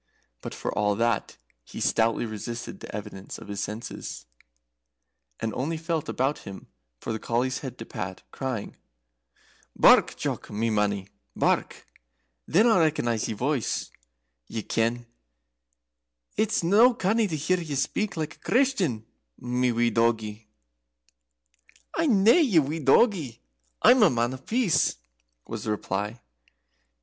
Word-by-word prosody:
But, -, -, -6 dB
for -, -, -3 dB
all 105 Hz, -1 st, +2 dB
that, 115 Hz, -1 st, 0 dB, 0.3 s
he -, -, -9 dB
stoutly 115 Hz, +1 st, +2 dB
resisted 115 Hz, +2 st, -6 dB
the -, -, -9 dB
evidence 100 Hz, -2 st, -7 dB
of -, -, -12 dB
his 100 Hz, 0 st, -3 dB
senses, 105 Hz, -, -6 dB, 1.1 s
and 110 Hz, -1 st, -2 dB
only 155 Hz, +8 st, -2 dB
felt 165 Hz, -1 st, -2 dB
about 135 Hz, +3 st, 0 dB
him 95 Hz, -1 st, -10 dB, 0.3 s
for 115 Hz, -, -4 dB
the 110 Hz, -, -3 dB
collie's 125 Hz, +4 st, -1 dB
head 130 Hz, -3 st, -7 dB
to 115 Hz, -, -7 dB
pat, 95 Hz, -3 st, -6 dB
crying: 130 Hz, -6 st, -4 dB, 1.0 s
"Bark! -, -, +6 dB
Jock, -, -, -3 dB
my 110 Hz, +2 st, -1 dB
mannie, 100 Hz, -2 st, 0 dB, 0.3 s
bark! -, -, 0 dB, 0.6 s
Then 200 Hz, +8 st, +4 dB
I'll 225 Hz, -6 st, +5 dB
recognize 120 Hz, -9 st, +1 dB
your 110 Hz, -, -4 dB
voice, 130 Hz, -2 st, -1 dB, 0.6 s
ye 110 Hz, -, -4 dB
ken. 115 Hz, +1 st, 0 dB, 1.3 s
It's 215 Hz, -3 st, +1 dB
no 220 Hz, +8 st, +5 dB
canny 220 Hz, +1 st, +1 dB
to 165 Hz, -, -3 dB
hear 180 Hz, +5 st, +1 dB
ye 155 Hz, -4 st, -4 dB
speak 205 Hz, +8 st, -1 dB
like 155 Hz, 0 st, -4 dB
a -, -, -38 dB
Christian, 200 Hz, -, +1 dB, 0.3 s
my 125 Hz, 0 st, 0 dB
wee 120 Hz, 0 st, +2 dB
doggie." 110 Hz, -1 st, 0 dB, 1.5 s
"I'm 260 Hz, -12 st, +3 dB
nae 230 Hz, -, +7 dB
your 165 Hz, -, +2 dB
doggie, 150 Hz, -, +3 dB, 0.4 s
I'm 255 Hz, -1 st, +7 dB
a 210 Hz, -, +7 dB
Man 120 Hz, -1 st, 0 dB
of 130 Hz, 0 st, -11 dB
Peace," 230 Hz, -7 st, +2 dB, 0.5 s
was 115 Hz, -2 st, -6 dB
the -, -, -2 dB
reply. 105 Hz, +2 st, -2 dB
125 Hz, 135 wpm, -26 LUFS, 110-170 Hz, 1.5 s, nae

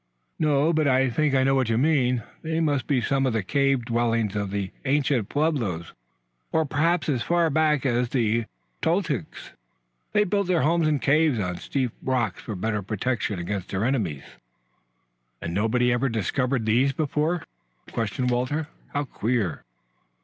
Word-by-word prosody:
"No; 150 Hz, +1 st, +3 dB
but 155 Hz, -2 st, +2 dB
I 130 Hz, -1 st, +3 dB
think 150 Hz, +2 st, +1 dB
I 130 Hz, -, +4 dB
know 135 Hz, +1 st, +3 dB
what 130 Hz, -4 st, +1 dB
you 110 Hz, -, +2 dB
mean. 125 Hz, -4 st, +2 dB, 0.2 s
They 160 Hz, 0 st, -2 dB
must 145 Hz, -4 st, 0 dB
be 135 Hz, -4 st, +2 dB
some 135 Hz, +2 st, +1 dB
of 125 Hz, -, 0 dB
the 110 Hz, -3 st, 0 dB
cave 135 Hz, +2 st, +1 dB
dwellings 115 Hz, -3 st, 0 dB
of 100 Hz, -1 st, -1 dB
the 100 Hz, -1 st, -3 dB
ancient 135 Hz, -5 st, +1 dB
Pueblos, 125 Hz, -, -1 dB, 0.6 s
or 160 Hz, 0 st, +2 dB
perhaps 160 Hz, +4 st, +1 dB
as 135 Hz, -6 st, 0 dB
far 170 Hz, +1 st, +2 dB
back 150 Hz, -2 st, +2 dB
as 120 Hz, -1 st, +1 dB
the 115 Hz, -3 st, +1 dB, 0.4 s
Toltecs. 160 Hz, -, -1 dB, 0.6 s
They 210 Hz, -, +4 dB
built 200 Hz, -1 st, 0 dB
their 180 Hz, -3 st, +2 dB
homes 165 Hz, +1 st, +2 dB
in 150 Hz, -1 st, +2 dB
caves 150 Hz, -1 st, +3 dB
on 90 Hz, -3 st, -1 dB
the -, -, -12 dB
steep 130 Hz, -4 st, -1 dB
rocks 120 Hz, -7 st, -1 dB
for 110 Hz, -, -5 dB
better 105 Hz, +2 st, -1 dB
protection 110 Hz, +1 st, -2 dB
against 95 Hz, +2 st, -4 dB
their 95 Hz, +3 st, -1 dB
enemies." 100 Hz, -, -1 dB, 1.2 s
"And 85 Hz, -, -4 dB
nobody 120 Hz, +5 st, +2 dB
ever 125 Hz, +2 st, +1 dB
discovered 120 Hz, +3 st, -1 dB
these 125 Hz, +5 st, +3 dB
before?" 155 Hz, +3 st, 0 dB, 0.5 s
questioned. 120 Hz, +3 st, -1 dB
Walter. 145 Hz, +6 st, -1 dB, 0.3 s
"How 145 Hz, -, +1 dB
queer!" 115 Hz, -, -2 dB
130 Hz, 165 wpm, -25 LUFS, 115-150 Hz, 1.2 s, I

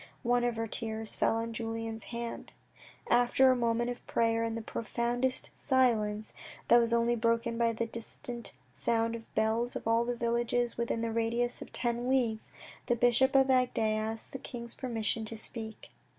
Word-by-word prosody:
One 245 Hz, 0 st, +2 dB
of 240 Hz, -1 st, +1 dB
her 225 Hz, 0 st, -2 dB
tears 220 Hz, 0 st, -2 dB
fell -, -, +2 dB
on 230 Hz, 0 st, -2 dB
Julien's 225 Hz, 0 st, -4 dB
hand. 235 Hz, 0 st, -6 dB, 0.6 s
After 245 Hz, +2 st, +5 dB
a -, -, +3 dB
moment 235 Hz, 0 st, +1 dB
of 245 Hz, -, -8 dB
prayer 230 Hz, 0 st, +2 dB
in 225 Hz, 0 st, -2 dB
the 230 Hz, -, -3 dB
profoundest 240 Hz, +3 st, -1 dB
silence, 220 Hz, -6 st, +1 dB, 0.4 s
that 240 Hz, -, +8 dB
was 230 Hz, -1 st, +3 dB
only 235 Hz, 0 st, +3 dB
broken 230 Hz, 0 st, +1 dB
by 230 Hz, 0 st, +2 dB
the 230 Hz, +1 st, -1 dB
distant 230 Hz, 0 st, -5 dB, 0.2 s
sound 230 Hz, -, 0 dB
of 225 Hz, -1 st, -8 dB
the -, -, -33 dB
bells 225 Hz, +3 st, +1 dB
of -, -, -4 dB
all 230 Hz, +1 st, +3 dB
the 245 Hz, +1 st, -2 dB
villages 235 Hz, 0 st, 0 dB
within 235 Hz, -1 st, -1 dB
a 230 Hz, -, -2 dB
radius 230 Hz, +2 st, 0 dB
of -, -, -9 dB
ten 240 Hz, 0 st, -1 dB
leagues, 235 Hz, -5 st, 0 dB, 0.4 s
the 240 Hz, -, +3 dB
bishop 245 Hz, +3 st, +3 dB
of 270 Hz, 0 st, +5 dB
Agde 255 Hz, -1 st, +2 dB
asked 220 Hz, 0 st, -1 dB
the 270 Hz, -, -6 dB
king's 235 Hz, -2 st, -6 dB
permission 225 Hz, -3 st, -2 dB
to 225 Hz, +1 st, -6 dB
speak. 220 Hz, 0 st, -5 dB
235 Hz, 180 wpm, -31 LUFS, 225-240 Hz, 0.6 s, that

